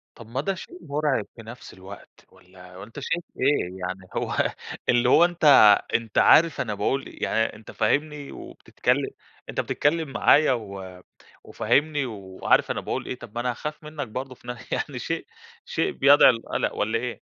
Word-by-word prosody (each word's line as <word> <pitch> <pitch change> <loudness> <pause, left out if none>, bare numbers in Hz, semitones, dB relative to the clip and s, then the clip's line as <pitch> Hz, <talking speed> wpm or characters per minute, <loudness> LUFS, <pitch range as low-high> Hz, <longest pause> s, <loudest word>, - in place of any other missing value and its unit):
طب 115 -2 -13
ما 125 +4 -3
ده 195 +6 -1
شيء 180 - -10
مرعب 145 -7 -1
في 115 - -11
نفس 115 +3 -11
الوقت، 95 +1 -13
والّا 90 0 -14
أنت 115 +7 -10
شايف 165 +5 -2 0.2
إيه؟ 140 +3 +2 0.2
يعني 95 +1 -6
هو - - -2 0.5
اللي 120 +1 +3
هو 170 - +6
أنت 175 -1 -5 0.5
أنت 115 -3 -1
عارف 165 -2 +5
أنا 110 - -3
باقول 120 +7 -1 0.2
يعني 110 -1 0
أنت 110 - -12
فاهمني 145 +5 -1
وبتتكلم، - - -2 0.4
أنت - - -1
بتتكلم 155 0 0
معايا 150 +1 +4
و 95 -5 -7 0.4
وفاهمني 145 -1 0
وعارف 95 -5 0
أنا - - -3
باقول - - -4
إيه، 130 - -4
طب 115 -2 -12
ما 120 - -1
أنا 125 0 0
هاخاف 150 +5 -7
منك 150 -3 -6
برضو 130 +4 -6
في 120 - -20
ن 120 0 -5
يعني - - -3
شيء، - - -4 0.4
شيء - - -1
بيدعو 140 -1 +6
للقلق 115 -1 -3
والّا 110 +2 0
إيه؟ 125 0 -5
125 Hz, 170 wpm, -25 LUFS, 105-145 Hz, 0.5 s, هو